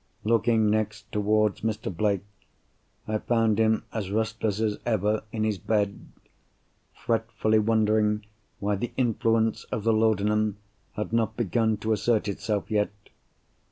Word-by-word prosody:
Looking 115 -1 +3
next 105 0 -2
towards 105 0 +1
Mr. 105 -4 -3
Blake, 100 0 +1 0.8
I 110 0 0
found 115 -2 +1
him 110 0 +3
as 105 -4 -3
restless 110 0 -1
as 110 -2 0
ever 110 -2 +1
in 110 -1 -2
his 105 -3 0
bed; 105 -2 -1 0.8
fretfully 115 -1 0
wondering 105 -1 +2 0.3
why 100 0 0
the 120 - -4
influence 115 -2 +1
of 105 - -4
the 115 0 +3
laudanum 105 -1 +2 0.4
had 105 +1 -4
not 110 -1 +1
begun 110 0 +1
to 110 +2 0
assert 110 0 +1
itself 105 +1 -2
yet. 105 -1 +2
110 Hz, 130 wpm, -26 LUFS, 105-110 Hz, 0.8 s, Looking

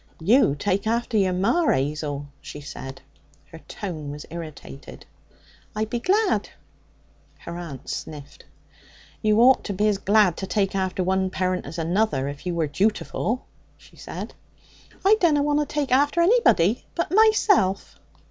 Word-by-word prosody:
'You 190 - +4
take 195 +7 -1
after 235 +1 -1
your 195 -3 +3
ma, 230 - +1
'Azel,' 145 +1 -1
she 150 - -9
said. 135 -2 -9 0.5
Her 165 - -10
tone 160 -8 -6
was 145 +1 -8
irritated. 155 -5 -9 0.7
'I 215 +1 0
be 235 +2 -3
glad.' 400 - +1 0.9
Her 170 - -8
aunt 155 -7 -8
sniffed. 145 -2 -7 0.8
'You 215 0 +3
ought 260 +2 +5
to 200 - -3
be 210 +3 +1
as 205 -2 +1
glad 200 -4 +3
to 190 - -5
take 195 0 0
after 190 -1 -1
one 190 +1 0
parent 185 -2 -2
as 160 +4 -8
another, 170 -4 0
if 140 +5 -7
you 175 - -2
were 165 -2 +1
jutiful,' 215 - -1 0.4
she - - -20
said. - - -8 0.7
'I 425 +2 +6
dunna 300 -5 +3
want 295 0 +1
to 295 - -1
take 290 -2 -2
after 285 +5 +3
anybody 340 - +3
but 340 - -2
myself.' 410 - +3
195 Hz, 150 wpm, -24 LUFS, 165-245 Hz, 0.9 s, I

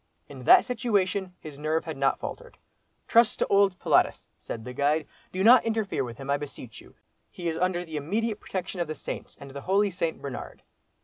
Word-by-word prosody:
In 130 -3 -10
that - - +8
situation 200 -6 0
his 150 -2 -10
nerve 155 +2 0
had 160 -2 -5
not 135 0 +1
faltered. - - -7 0.5
"Trust 230 -1 +4
to - - +1
old 200 -2 +4
'Pilatus,'" - - +2
said 110 -1 -7
the 125 - -6
guide; 145 +3 +1 0.3
"do 185 +1 -1
not 240 +2 +8
interfere 220 -9 -1
with 120 -2 -7
him, 135 0 -8
I 140 0 +2
beseech 140 -5 -9
you; - - -18 0.3
he 175 - -6
is 160 -1 -1
under 180 0 0
the 160 -2 -5
immediate 210 +8 -1
protection 185 -1 -4
of 170 - -1
the 155 - -4
saints, - - -7
and 140 -1 -10
the 140 +1 -7
holy 200 +4 +2
St. 170 -2 -2
Bernard." 135 -3 -7
170 Hz, 200 wpm, -27 LUFS, 140-200 Hz, 0.5 s, that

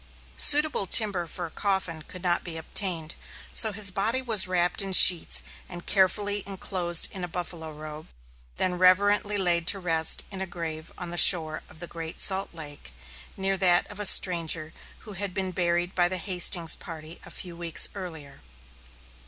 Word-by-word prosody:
Suitable 295 -8 +2
timber 190 -4 +2
for 175 +1 -7
a 165 - -11
coffin 190 -5 -4
could 180 +3 -13
not 175 -1 -1
be 165 -2 -7
obtained, 165 -1 -1 0.4
so 220 - +4
his 200 -1 +1
body 215 +7 -1
was 225 -7 +1
wrapped 180 0 -1
in 195 -1 -5
sheets 180 -2 +7 0.3
and 175 0 -11
carefully 205 +1 0
enclosed 185 -3 +1
in 190 -3 -7
a - - -4
buffalo 165 -2 -8
robe, 155 0 -12 0.5
then 180 -1 -3
reverently 205 +3 +1
laid 175 -3 -1
to 195 - +3
rest 165 -4 0
in 190 -1 -8
a 190 - -5
grave 165 -3 -9
on 175 -1 -7
the 175 - -7
shore 160 -3 +5
of 170 +2 -11
Great 165 -1 -9
Salt 190 0 -1
Lake, 145 - -10 0.4
near 195 0 -3
that 175 -2 +2
of 205 - -12
a 210 - -1
stranger, 165 -4 +3 0.3
who 210 - -11
had 195 -1 -7
been 190 -1 -4
buried 175 0 -3
by 175 -1 +1
the 185 +1 -3
Hastings 175 -2 +3
party 160 -1 -11
a - - -14
few 175 -2 -8
weeks 170 -1 -1
earlier. 160 -7 -11
180 Hz, 170 wpm, -24 LUFS, 165-195 Hz, 0.5 s, sheets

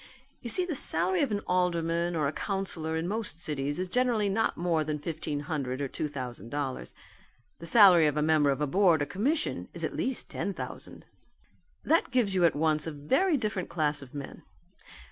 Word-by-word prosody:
You 240 - -7
see 360 +10 0
the 350 - -4
salary 180 - +9
of 280 - 0
an 205 -1 -3
alderman 170 -2 -1
or 150 -3 -1
councillor 170 -5 -4
in 165 +2 -4
most 210 -3 -4
cities 145 -4 -2
is 185 +1 -4
generally 235 -1 0
not 220 +3 -1
more 170 -2 -1
than 150 0 -4
fifteen 150 -1 -6
hundred 140 -4 -5
or 140 - -3
two 150 - -5
thousand 125 -5 -8
dollars. 135 - -6 0.6
The 170 - -10
salary 180 -5 +6
of 150 0 -2
a 150 - 0
member 155 -2 +2
of 140 +1 -2
a - - +1
board 165 0 +2
or - - -3
commission 270 - -3
is - - -6
at - - -4
least 260 -1 -3
ten 200 - -5
thousand. - - -9 0.8
That 325 +2 +1
gives 240 -6 0
you 180 -2 +2
at 165 - +1
once 155 0 0
a - - -4
very 270 - 0
different 210 -6 -4
class 150 -3 -2
of 135 0 -14
men. 140 -1 -9
165 Hz, 195 wpm, -27 LUFS, 150-200 Hz, 0.8 s, salary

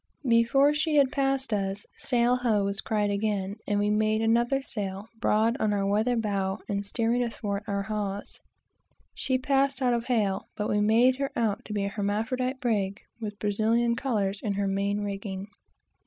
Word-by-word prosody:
Before 240 +5 +4
she 310 +1 0
had 275 -3 +5
passed 270 -3 0
us, 195 0 -2
"sail 245 -1 +2
ho!" 225 -5 +1
was 200 0 -1
cried 210 -2 0
again, 200 -1 -1
and 205 - +1
we 205 0 +1
made 215 +1 +2
another 235 +4 +2
sail, 200 -4 -4 0.2
far 220 0 +3
on 215 -1 +1
our 200 -1 0
weather 215 +5 +2
bow, 200 -3 -1
and 200 -1 -1
steering 230 +4 0
athwart 210 -4 -3
our 200 -1 -1
hawse. 205 -1 -4 0.7
She 260 -1 0
passed 275 +1 +1
out 250 -2 +2
of 235 -1 -1
hail, 210 -6 0
but 210 - -2
we 210 - +2
made 235 +5 +4
her 275 0 -1
out 220 -4 0
to 215 - -6
be 205 -1 0
an 200 - -2
hermaphrodite 225 +6 -1
brig, 205 -5 0 0.2
with 210 -2 -5
Brazilian 225 +3 +1
colors 210 -6 -1
in 210 - -1
her 200 0 -1
main 200 +1 0
rigging. 195 -1 -4
215 Hz, 175 wpm, -27 LUFS, 200-240 Hz, 0.7 s, had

